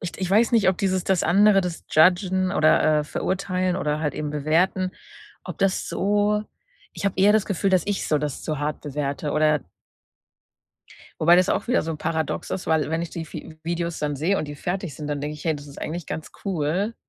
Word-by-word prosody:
ich 180 -3 -5
d - - -11
ich 185 0 -2
weiß 220 +4 +4
nicht, 220 -5 +4
ob 190 - +1
dieses 190 -2 0
das 190 -3 +1
andere, 200 +2 +5
das 180 -2 -5
Judgen 185 +3 +3
oder, 155 0 +4
äh, - - -4
verurteilen 185 +2 -1
oder 150 -3 -1
halt 150 -3 -1
eben 150 -1 -3
bewerten, 170 +5 +1 0.5
ob - - -7
das 195 -1 0
so 205 +2 +1 0.5
ich - - -6
habe 200 - +1
eher 205 +2 +6
das 215 -2 +2
Gefühl 195 0 0
dass 185 -1 +3
ich 205 -2 -1
so 150 - +2
das 145 -2 -4
zu 155 -3 -3
hart 150 +1 -3
bewerte 145 0 -3
oder 155 -1 +3 1.6
Wobei 170 +2 +6
das 185 +1 +3
auch - - -1
wieder 250 - +3
so 160 -1 -4
paradox 160 -1 -2
ist, 185 - -4
weil 160 -2 +1
wenn 160 +1 0
ich 170 - -5
die 165 -1 -5
Vi 160 - -8
Videos 170 0 -3
dann 145 -1 -2
sehe 175 +8 +1
und 150 - -3
die 145 - -7
fertig 180 -2 -4
sind, 150 - -6
dann 145 -1 -3
denke 150 +1 -4
ich: 150 - -11
„Hey, 160 - +1
das 145 0 -9
ist 140 - -11
eigentlich 165 +1 -5
ganz 160 - -6
cool.“ 190 +4 -1
170 Hz, 220 wpm, -24 LUFS, 150-190 Hz, 1.6 s, eher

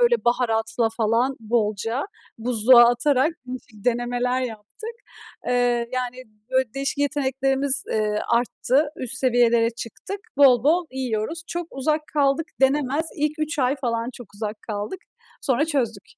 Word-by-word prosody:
böyle, 480 -1 +3
baharatla 225 -1 +1
falan 235 +4 +1
bolca 225 +2 -1 0.4
buzluğa 240 +1 +6
atarak 265 +4 +2 0.2
değişik 245 -5 -9
denemeler 245 +1 0
yaptık. 245 - -6 0.6
Eee, 245 -1 +1
yani, 255 0 -3 0.3
böyle, 260 -2 +1
değişik 275 +1 -2
yeteneklerimiz, 270 -1 +2
ııı, 210 -1 0
arttı, 255 +4 +1
üst 255 0 -4
seviyelere 235 -3 +3
çıktık 240 - -7 0.2
bol 260 -4 +6
bol 335 +3 +3
yiyoruz. 260 +4 -3
Çok 345 0 -4
uzak 305 +3 -1
kaldık 290 +1 +2
denemez, 280 +3 +2
ilk 300 0 -1
3 310 +1 -2
ay 260 +1 +2
falan 235 -3 -2
çok 245 - -10
uzak 210 0 -5
kaldık. 210 - -4 0.4
Sonra 275 0 +2
çözdük. 235 -10 -1
250 Hz, 130 wpm, -23 LUFS, 230-280 Hz, 0.6 s, buzluğa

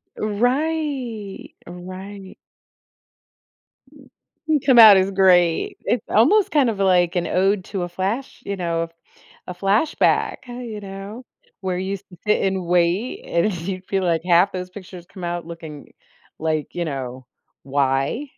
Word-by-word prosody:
Right, 245 -1 -2
right. 185 +2 -9 2.3
Come 260 -3 +6
out 215 -3 +10
as 190 +1 +1
great. 180 -4 +3
It's 240 - -1
almost, 360 - +4
kind 285 -5 +3
of, 210 -3 -4
like, 180 -2 +3
an 175 - 0
ode 190 +1 +1
to 195 -3 -4
a 175 - -4
flash, 200 +9 -3
you 200 - -3
know, 165 -2 -2 0.6
a 180 - -5
flashback, 200 - +1
huh, 245 - -9
you 225 -4 -6
know, 200 +5 -8 0.4
where 185 -2 -2
you 190 +2 -3
sit 190 +3 -2
and 190 -2 -1
wait, 175 +7 0
and 170 +5 +1
you 185 +1 -4
feel, 195 -1 0
like, 165 -3 +1
half 175 +2 +4
those 180 -1 -5
pictures 180 -2 -11
come 185 -3 -10
out 175 -1 -3
looking 160 -4 -10 0.5
like, 155 -1 -2
you 175 -1 -2
know, 130 -3 -5 0.4
"Why?" 135 - 0
190 Hz, 135 wpm, -21 LUFS, 175-210 Hz, 2.3 s, out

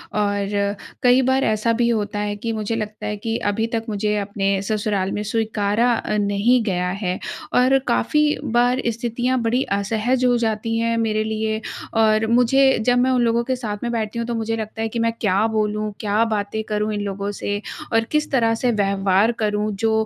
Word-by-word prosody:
और 205 0 0 0.3
कई 250 +1 +5
बार 265 +1 +2
ऐसा 220 +1 +1
भी 235 +1 +1
होता 210 -2 -1
है 205 0 -2
कि 230 +3 -4
मुझे 215 +1 -2
लगता 215 -1 -5
है 210 0 -3
कि 225 +2 -2
अभी 225 +2 -1
तक 225 0 -2
मुझे 210 0 0
अपने 195 -1 -1
ससुराल 205 -2 -1
में 210 - -2
स्वीकारा 220 +1 +1
अ, 215 -2 -1
नहीं 205 +5 +2
गया 180 -3 -1
है 180 0 -1 0.3
और 255 +2 +4
काफ़ी 300 +5 +2
बार 245 +2 +2
स्थितियाँ 240 +2 -1
बड़ी 235 +3 +1
असहज 225 +5 0
हो 245 -1 +4
जाती 225 0 -1
हैं 230 0 +1
मेरे 215 -1 0
लिए। 220 0 -2 0.4
और 215 0 +3
मुझे 250 +4 +4 0.2
जब 245 0 +3
मैं 260 +1 +3
उन 250 -1 +2
लोगों 235 0 +2
के 260 +2 -1
साथ 220 -5 -4
में 235 - -1
बैठती 230 0 -2
हूँ 230 - -3
तो 235 - -2
मुझे 225 0 -1
लगता 220 0 -5
है 225 - 0
कि 230 +1 -4
मैं 230 0 +1
क्या 205 0 +2
बोलूँ, 215 -1 -1
क्या 210 +1 +1
बातें 210 +1 -3
करूँ, 210 0 -2
इन 205 - -2
लोगों 200 0 -3
से 205 0 -2 0.3
और 225 0 +4
किस 300 -1 0
तरह 230 -4 +3
से 245 +2 0
व्यवहार 200 0 +2
करूँ, 210 0 0
जो 225 +3 0
220 Hz, 195 wpm, -21 LUFS, 205-235 Hz, 0.4 s, कई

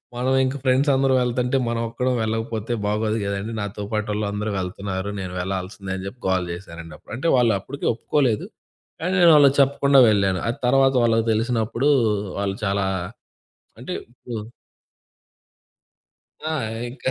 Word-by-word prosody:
మనం 125 +2 0
ఇంకా, 130 +2 -2
ఫ్రెండ్స్ 135 +3 +3
అందరం 135 0 +3
వెళ్తుంటే, 125 +2 0
మనం 115 0 -1
ఒక్కరం 125 +2 -1
వెళ్ళకపోతే, 110 +1 -2
బాగోదు 110 +1 0
గదని, 100 +2 -3
నాతో 100 0 -5
పాటోళ్ళందరూ 105 -1 -2
వెళ్తున్నారు, 95 +1 -4
నేను 90 -2 -5
వెళ్లాల్సిందే 95 +1 -4
అని 95 - -7
చెప్పి 120 +5 -10
గోల 95 -1 +2
చేశానండి 85 -2 -9
అప్పుడు. - - -13
అంటే 165 +5 0
వాళ్ళప్పుడికీ 120 +3 0
ఒప్పుకోలేదు, 120 -2 0 0.5
కానీ 180 +3 -1
నేను 170 -1 +8
వాళ్ళకి 140 -2 +6
చెప్పకుండా 140 0 +4
వెళ్ళాను. 100 -3 +2
అది 120 - -3
తరవాత 135 +1 +4
వాళ్ళకి 115 0 +2
తెలిసినప్పుడూ, 115 +3 0 0.5
వాళ్ళు 100 -1 -2
చాలా 100 0 0 0.9
అంటే 155 +9 -5 0.2
ఇప్పుడు 120 0 -11 2.2
ఆ! - - -1 0.4
ఇంకా 130 0 -3
110 Hz, 135 wpm, -23 LUFS, 100-130 Hz, 2.2 s, నేను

